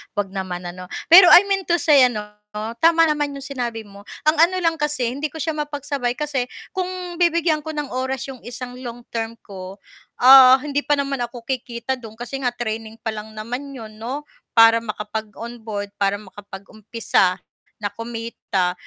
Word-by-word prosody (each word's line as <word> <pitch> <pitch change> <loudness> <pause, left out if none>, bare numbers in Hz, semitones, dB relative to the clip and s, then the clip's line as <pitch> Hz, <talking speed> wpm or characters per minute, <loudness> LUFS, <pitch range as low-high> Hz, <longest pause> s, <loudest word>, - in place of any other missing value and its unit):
huwag 200 -2 -2
naman 185 -2 -5
ano. 180 +1 -8 0.2
Pero 360 +1 +11
I 355 +1 +9
mean 390 -1 -1
to 345 - +3
say 290 -6 +5
ano, 215 -4 -4 0.6
tama 330 0 +5
naman 295 -3 0
'yung 275 - -8
sinabi 245 -5 -4
mo 200 -1 -14 0.2
ang 305 - +4
ano 350 +3 +4
lang 330 0 +1
kasi 295 -5 0
hindi 285 +4 -3
ko 320 - -10
siya 320 - -1
mapagsabay 285 -4 -3
kasi 280 -5 -2 0.3
kung 370 -2 -1 0.3
bibigyan 340 -2 +2
ko 315 +1 -7
ng 295 -2 -4
oras 260 +1 -2
'yong 260 - -11
isang 250 +1 -7
long 240 -1 -8
term 230 0 -3
ko, 190 -1 -9 0.5
ah, 260 0 +10
hindi 290 -1 -2
pa 295 - +4
naman 275 -2 -2
ako 240 0 -5
kikita 250 0 -3
do'n 220 -2 -11
kasi 245 +4 -6
nga 245 -2 -1
training 220 -2 -4
pa 225 - -1
lang 215 0 -8
naman 245 +6 -6
'yon 215 -3 -10
'no 260 +6 -5 0.3
para 225 0 +7
makapag-on 220 +1 -6
board, 205 -2 -5
para 200 0 +2
makapag-umpisa 205 0 -2 0.4
na 205 -1 -4
kumita, 230 -5 -3
245 Hz, 175 wpm, -21 LUFS, 220-285 Hz, 0.6 s, Pero